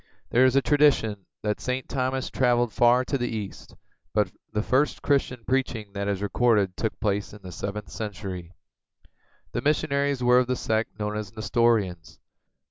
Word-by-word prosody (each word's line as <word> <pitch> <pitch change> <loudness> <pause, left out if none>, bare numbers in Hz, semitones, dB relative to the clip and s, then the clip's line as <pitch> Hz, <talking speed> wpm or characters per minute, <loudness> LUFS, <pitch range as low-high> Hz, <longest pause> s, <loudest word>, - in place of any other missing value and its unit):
There 125 +2 +5
is 130 0 +3
a 135 - +4
tradition 135 -10 +3 0.2
that 105 -1 -1
St. 125 0 -2
Thomas 130 0 -2
traveled 120 -3 +2
far 120 +3 +4
to 140 - -1
the 120 - 0
east, 105 -4 -6 0.4
but 105 -4 +2 0.2
the 105 0 -1
first 135 +5 +1
Christian 130 -4 +1
preaching 125 -6 -1
that 100 0 -3
is 100 -1 -1
recorded 105 -3 +2
took 110 - -3
place 100 -1 -1
in 105 - -13
the 90 - -8
seventh 100 +4 -5
century. 95 -5 -6 1.0
The - - -2
missionaries 140 -3 +1
were 125 +1 +6
of 125 - +1
the 130 - 0
sect 110 -3 -1
known 105 0 -2
as 105 -1 -5
Nestorians. 110 -6 0
115 Hz, 165 wpm, -26 LUFS, 105-130 Hz, 1.0 s, were